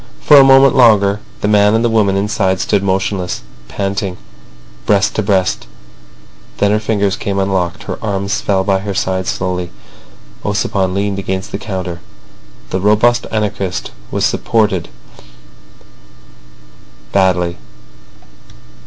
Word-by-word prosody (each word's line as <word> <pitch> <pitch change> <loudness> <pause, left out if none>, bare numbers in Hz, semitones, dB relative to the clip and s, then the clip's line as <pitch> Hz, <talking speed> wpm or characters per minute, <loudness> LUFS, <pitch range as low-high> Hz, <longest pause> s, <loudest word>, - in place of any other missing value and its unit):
For 150 - +6
a 135 - +9
moment 135 0 +6
longer 105 -5 +4 0.2
the - - 0
man 105 0 +4
and 115 +1 +1
the - - +4
woman 105 -4 +2
inside 100 -2 0
stood 100 - +1
motionless, 95 -1 -2 0.2
panting, 100 -2 -3 0.7
breast 100 -1 +2
to - - -1
breast; 95 -3 0 0.9
then 100 0 +2
her 105 - +2
fingers 105 -3 0
came 100 -1 -3
unlocked, 95 -3 -1
her - - -6
arms 100 -1 -2
fell 95 -2 0
by 95 0 +1
her 100 0 -5
side 95 -1 -1
slowly. 90 -1 -2 0.7
Ossipon 100 -2 -1
leaned 100 0 -1
against 95 +1 -4
the - - -4
counter. 90 -4 -5 0.7
The 95 - -1
robust 110 +4 +3
anarchist 100 -4 -2 0.2
wanted - - 0
support 105 -7 0 2.2
badly. 90 -3 +1
100 Hz, 125 wpm, -15 LUFS, 95-105 Hz, 2.2 s, a